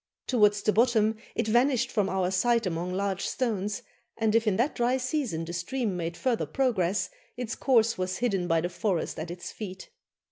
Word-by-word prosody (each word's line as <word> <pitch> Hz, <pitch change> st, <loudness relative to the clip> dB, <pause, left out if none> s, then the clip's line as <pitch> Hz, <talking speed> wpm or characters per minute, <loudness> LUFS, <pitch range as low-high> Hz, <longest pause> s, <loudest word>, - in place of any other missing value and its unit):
Towards 210 Hz, -4 st, +3 dB
the 215 Hz, -, +3 dB
bottom 220 Hz, -2 st, +3 dB, 0.2 s
it -, -, 0 dB
vanished 245 Hz, +2 st, +3 dB
from 205 Hz, -3 st, +1 dB
our 185 Hz, -1 st, 0 dB
sight 230 Hz, +4 st, +2 dB
among 175 Hz, 0 st, -2 dB
large 195 Hz, 0 st, -1 dB
stones, 210 Hz, -5 st, -2 dB, 0.3 s
and 220 Hz, -1 st, +1 dB
if 230 Hz, 0 st, +3 dB
in 205 Hz, -, +3 dB
that 245 Hz, +8 st, +1 dB
dry 245 Hz, +2 st, +1 dB
season 255 Hz, -, -2 dB
the 170 Hz, -, -6 dB
stream 200 Hz, +4 st, -2 dB
made 170 Hz, -1 st, -3 dB
further 250 Hz, -4 st, 0 dB
progress, 215 Hz, -, 0 dB, 0.3 s
its 240 Hz, -2 st, -3 dB
course 230 Hz, -6 st, +2 dB
was 185 Hz, 0 st, -1 dB
hidden 195 Hz, -7 st, 0 dB
by 165 Hz, -1 st, +2 dB
the 175 Hz, -, -2 dB
forest 175 Hz, -3 st, -2 dB
at 160 Hz, +2 st, -5 dB
its 175 Hz, +1 st, -6 dB
feet. 190 Hz, -3 st, -8 dB
210 Hz, 185 wpm, -28 LUFS, 185-240 Hz, 0.3 s, Towards